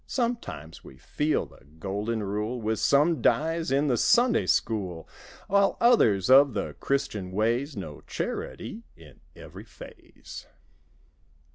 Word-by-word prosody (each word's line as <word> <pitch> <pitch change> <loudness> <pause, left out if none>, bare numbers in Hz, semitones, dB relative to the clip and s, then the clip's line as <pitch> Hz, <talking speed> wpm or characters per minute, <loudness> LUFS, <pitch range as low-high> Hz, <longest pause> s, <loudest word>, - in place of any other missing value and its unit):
Sometimes 235 - -4
we 65 - -14
feel 150 - -1
the - - -19
Golden 105 +5 -3
Rule 105 +5 -3
With 110 -1 -2
some 150 0 +3
dies 165 +5 +1
in 140 +2 +1
the 130 -5 +1
Sunday 240 - +3
School. 95 -7 -1 0.4
While 200 0 +2
others 110 - +4
of 135 -2 +6
the 100 - -3
Christian 105 -9 -2
ways 120 +7 -1
Know 80 -7 -7
charity 225 - -5
in - - -17 0.2
every - - -12
phase. - - -13
120 Hz, 125 wpm, -26 LUFS, 100-155 Hz, 0.4 s, of